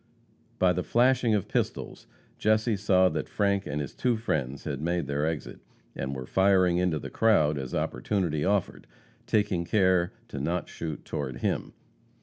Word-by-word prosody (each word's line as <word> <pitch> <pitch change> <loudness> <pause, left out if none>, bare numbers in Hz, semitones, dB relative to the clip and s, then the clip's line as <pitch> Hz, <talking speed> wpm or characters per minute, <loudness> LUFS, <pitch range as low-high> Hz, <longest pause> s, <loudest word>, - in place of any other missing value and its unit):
By 90 -1 +3
the 90 - -1
flashing 120 +2 +3
of 100 - -1
pistols, - - -3 0.3
Jesse 110 +1 +2
saw 95 -2 +3
that 80 - -4
Frank 100 -1 0
and 75 0 -2
his 70 -3 -4
two 125 -3 0
friends 70 - -2
had 70 -1 -4
made 85 0 0
their 70 +2 -1
exit, 80 -2 -4 0.4
and 70 0 -3
were 65 -1 -5
firing 95 +1 +3
into 90 -3 +1
the - - -7
crowd 80 -10 +3
as 65 -2 -5
opportunity 85 -8 -1
offered, 100 -1 -1 0.4
taking 100 -5 +1
care 95 -2 +2 0.2
to 70 - -5
not 85 +6 -2
shoot 80 -3 -6
toward 65 -1 -4
him. - - -1
90 Hz, 160 wpm, -28 LUFS, 75-100 Hz, 0.4 s, By